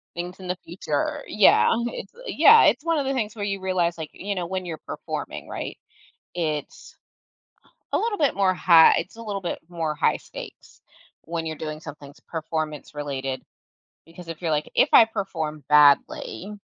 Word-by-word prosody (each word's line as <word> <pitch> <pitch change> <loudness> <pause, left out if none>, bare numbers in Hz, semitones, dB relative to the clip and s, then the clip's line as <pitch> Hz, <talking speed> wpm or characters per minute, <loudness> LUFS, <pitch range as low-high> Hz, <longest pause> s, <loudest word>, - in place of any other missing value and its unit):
things 180 +2 -6
in 185 - -9
the 180 0 -2
future. 165 -4 -3
Yeah. 210 -2 +5 0.2
It's - - -7
yeah, 435 - +7
it's - - +3
one 330 -1 +1
of 280 - -2
the 270 - 0
things 220 -5 -2
where 205 -2 -3
you 195 -1 -2
realize, 180 -3 0
like, 160 -2 -6
you 200 +1 -4
know, 180 -2 -2
when 185 0 -4
you're 160 -3 -6
performing, - - -6
right, - - -6 0.6
it's 155 -4 -4 1.0
a - - +2
little 440 -2 -1
bit 290 -3 +2
more 195 -1 +3
high 170 -2 +6
it's 195 - -6
a 230 - -9
little 205 -3 -4
bit 175 - -4
more 165 -3 -3
high - - +2
stakes - - -12 0.4
when 165 0 -4
you're 160 -1 -4
doing 155 0 -6
somethings 145 -2 -11
performance-related. 145 -4 -4 0.6
Because 165 +1 -13
if 165 0 -8
you're 165 -3 -1
like, 150 0 -1
if - - +4
I 230 - +9
perform 160 -8 -4
badly 150 +6 +3
170 Hz, 175 wpm, -24 LUFS, 155-195 Hz, 1.0 s, I